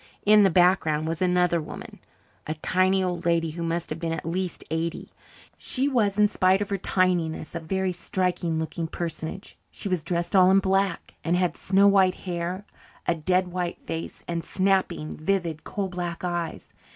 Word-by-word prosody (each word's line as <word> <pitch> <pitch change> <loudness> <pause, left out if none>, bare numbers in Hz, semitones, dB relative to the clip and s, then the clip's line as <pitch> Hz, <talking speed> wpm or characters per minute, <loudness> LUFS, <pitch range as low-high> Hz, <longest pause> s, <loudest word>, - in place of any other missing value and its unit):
In 210 0 +7
the 195 - +5
background 175 -3 +3
was 165 +1 -3
another 180 -2 +2
woman 150 - -9 0.5
a 155 - -2
tiny 185 +4 +2
old 175 -2 -2
lady 165 -1 +1
who 170 +2 -7
must 170 0 -2
have 155 - -3
been 165 0 -2
at 165 - -4
least 180 +1 -3
eighty. 165 +1 -3 0.5
She 265 +2 0
was, 215 -7 +1
in 210 0 +6
spite 190 -1 +3
of 205 - -3
her 200 - +1
tininess, 180 -5 0
a 170 - -3
very 190 +3 -1
striking 180 -2 -1
looking 160 +1 -3
personage; 165 +3 -6
she - - -5
was 180 -4 -1
dressed 170 +2 -1
all 185 -1 +7
in 190 - +6
black, 195 -1 0
and 170 +1 +1
had 180 -2 +1
snow 195 +1 +3
white 190 -2 +4
hair, 180 +2 -4 0.4
a - - +4
dead 180 +3 +1
white 175 -1 -3
face, 165 0 -5
and 170 -1 -2
snapping, 190 -5 0
vivid, 170 -2 -1
coal 200 -2 -3
black 175 -2 -5
eyes. 175 -2 -4
180 Hz, 175 wpm, -25 LUFS, 165-190 Hz, 0.5 s, In